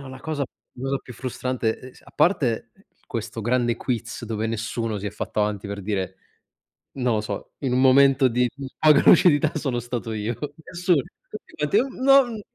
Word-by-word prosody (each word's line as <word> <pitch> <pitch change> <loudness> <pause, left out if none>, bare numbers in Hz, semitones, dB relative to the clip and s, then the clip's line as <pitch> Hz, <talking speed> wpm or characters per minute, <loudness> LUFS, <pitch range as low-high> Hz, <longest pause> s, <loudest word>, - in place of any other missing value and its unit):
no, 140 - -9
la 130 0 -10
cosa 155 -3 -2 0.3
la 125 - -10
cosa 135 0 0
più 125 - -12
frustrante, 125 -2 -2
e 130 0 -12
s - - -19
a - - -18
parte 135 - +1 0.3
questo 115 - -5
grande 120 0 +1
quiz, 120 -1 -4
dove 110 -1 -2
nessuno 115 -1 -3
si 100 - -5
è - - -2
fatto 105 +1 -3
avanti 105 -1 -1
per 100 0 -5
dire, 95 -2 -3 0.8
non 125 -3 0
lo 105 - +1
so: 105 -2 -6
"In 135 -3 -1
un 130 - +3
momento 135 0 +5
di 125 +1 +1 0.3
poca 155 -1 +6
lucidità, 155 -3 +6
sono 135 -5 -1
stato 120 -1 -4
io". 110 +2 -3 0.3
Nessuno. 175 -4 +2 0.6
Ma 150 - +1
ti 205 - +3
non 260 -4 +4
125 Hz, 180 wpm, -24 LUFS, 110-140 Hz, 0.8 s, poca